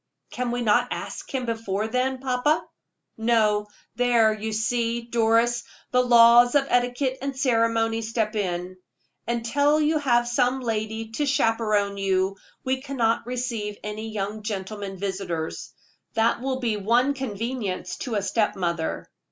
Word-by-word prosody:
"Can 250 0 -2
we 240 0 -1
not 240 +3 +3
ask - - -6
him 260 -2 -2
before 220 -3 -2
then, 255 +3 0
papa?" 270 +5 +1 0.5
"No; 215 -2 +2 0.3
there, 235 -3 +4
you 215 +1 -4
see, 230 +1 0
Doris, 235 +1 +2 0.3
the 250 - +4
laws 240 +1 +7
of 280 -1 +4
etiquette 245 +2 +1
and 275 -1 -4
ceremony 230 -3 +1
step 220 -1 -2
in. 180 -2 -3 0.5
Until 275 +6 +2
you 305 +1 +2
have 240 -4 +2
some 250 +2 +1
lady 220 -1 -3
to 290 +6 -1
chaperone 215 -6 +1
you, 195 0 0 0.3
we 260 0 -1
cannot 240 -5 0
receive 235 -5 -3
any 215 +1 -5
young 210 0 -4
gentlemen 200 -1 -5
visitors. 185 -4 -4 0.4
That 230 +1 +2
will 260 0 -2
be 230 -4 0
one 240 +7 +2
convenience 230 -5 -4
of 240 - -3
a 205 -2 0
step 210 +1 0
mother." 170 -4 -2
230 Hz, 140 wpm, -25 LUFS, 210-250 Hz, 0.5 s, laws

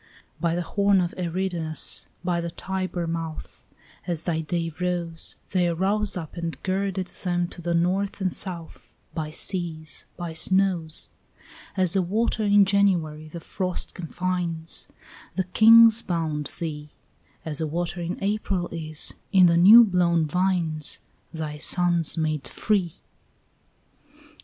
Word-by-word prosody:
By 170 -1 0
the 175 - -1
horn 200 +2 +2
of 175 -1 -1
Eridanus, 175 -2 0 0.2
by 175 -1 0
the 170 - -3
Tiber 185 0 -4
mouth, 165 -1 -6 0.4
As 170 -3 -1
thy 160 -2 -1
day 165 +1 -2
rose, 175 -2 -1 0.2
They 180 -2 +2
arose 195 +5 0
up 160 -4 -7
and 170 -1 -4
girded 190 0 -1 0.2
them 175 -1 0
to 175 - -10
the 170 0 -1
north 190 +4 0
and 185 -2 -1
south, 170 -4 -5 0.2
By 155 -2 -3
seas, 160 -1 -3
by 175 -2 -5
snows. 180 -2 0 0.7
As 185 -2 +2
a 190 - +3
water 220 +5 0
in 205 -1 +5
January 175 -6 +1
the 170 +2 -8
frost 185 +2 -2
confines, 175 -1 -2 0.5
Thy 190 - +1
kings 230 0 +8
bound 160 -4 -2
thee; 150 -3 -5 0.6
As 155 -1 -1
a 160 - 0
water 175 +2 -3
in 175 +2 -3
April 195 -3 -1
is, 155 -2 -3 0.2
in 190 -3 +6
the 170 -1 +4
new 205 +8 +9
blown 175 -5 +2
vines, 165 -2 -1 0.3
Thy 155 -2 -5
sons 175 -1 +2
made 155 -3 -1
free. 195 -6 0
175 Hz, 135 wpm, -25 LUFS, 165-190 Hz, 0.7 s, new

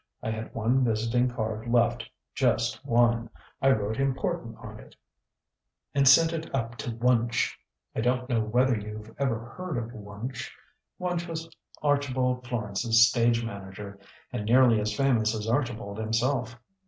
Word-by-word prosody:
I 110 - -1
had 110 0 -6
one 120 +4 +2
visiting 115 +2 +1
card 110 -1 -4
left 120 -1 +2 0.2
just 125 -1 +1
one. 120 -2 +2 0.3
I 135 - +4
wrote 110 -2 +1
'Important' 135 -1 -1
on - - -10
it, - - -15 1.0
and 140 -1 +3
sent 160 +4 +7
it 160 0 -5
up 115 -2 -2
to - - -4
Wunch. 120 0 +1 0.4
I - - 0
don't 125 +1 0
know 120 -3 +1
whether 125 +4 +2
you've 105 +1 -7
ever 120 -4 -1
heard 180 -6 -4
of 120 0 -4
Wunch. 105 +4 -6 0.5
Wunch 180 -1 -2
was 165 0 -5 0.4
Archibald 130 -4 +1
Florence's 115 0 +3
stage 115 -1 +2
manager, 100 -1 -8 0.3
and 105 - -3
nearly 120 -1 +5
as 105 0 -1
famous 115 -5 +2
as 105 0 -4
Archibald 115 -4 -1
himself. 115 +2 -1
120 Hz, 145 wpm, -27 LUFS, 110-130 Hz, 1.0 s, sent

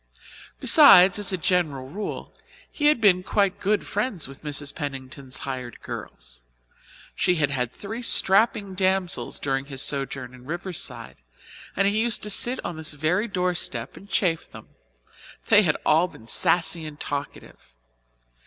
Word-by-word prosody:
Besides, 180 +3 +7
as 205 - 0
a 185 - -1
general 165 -7 0
rule, 200 +9 -6 0.4
he 295 - 0
had 300 -4 +4
been 195 -4 +4
quite 200 0 0
good 210 +2 0
friends 205 - -3
with 135 0 -13
Mrs. 145 -1 -4
Pennington's 135 -1 -6
hired 130 -3 -6
girls. - - -9 0.7
She 180 - +1
had 145 -4 0
had 125 -3 -2
three 220 - -7
strapping 205 -2 +3
damsels 190 -1 0
during 135 -1 -2
his 135 -1 -3
sojourn 135 -3 -2
in 125 -1 -15
Riverside, 155 -7 -5 0.6
and 195 +1 +2
he 205 +2 +1
used 230 -1 +1
to 210 - -2
sit 245 +5 +3
on 170 - -5
this 155 -1 -4
very 175 +9 0
doorstep 180 - -2
and 200 - -14
chaff 170 -6 0
them. - - -13 0.8
They 205 - +7
had 155 -7 +1
all 165 +4 +3
been 115 - -16
saucy 170 +4 +2
and 150 -1 -11
talkative. 145 - -7
170 Hz, 150 wpm, -24 LUFS, 135-195 Hz, 0.8 s, Besides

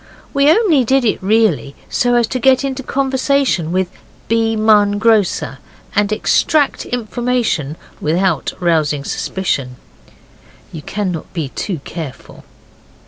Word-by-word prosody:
We 280 +1 +4
only 330 - +4
did 265 +2 +2
it, 215 - 0
really, 195 -8 +1
so 245 0 +1
as 240 -1 +3
to 255 - -2
get 260 +2 +4
into 270 -1 -3
conversation 265 - 0
with 185 0 0 0.4
B. 225 0 +1
Munn, 210 -2 +4
grocer, 210 -10 +1 0.4
and 205 0 +2
extract 285 +6 +1
information 235 - -1 0.2
without 180 +5 0
rousing 155 -5 +1
suspicion. 140 -8 -2 1.0
You 160 - -7
cannot 185 -3 -4
be 160 -6 -3
too 170 +2 -4
careful. 160 -6 -8
215 Hz, 120 wpm, -17 LUFS, 170-250 Hz, 1.0 s, We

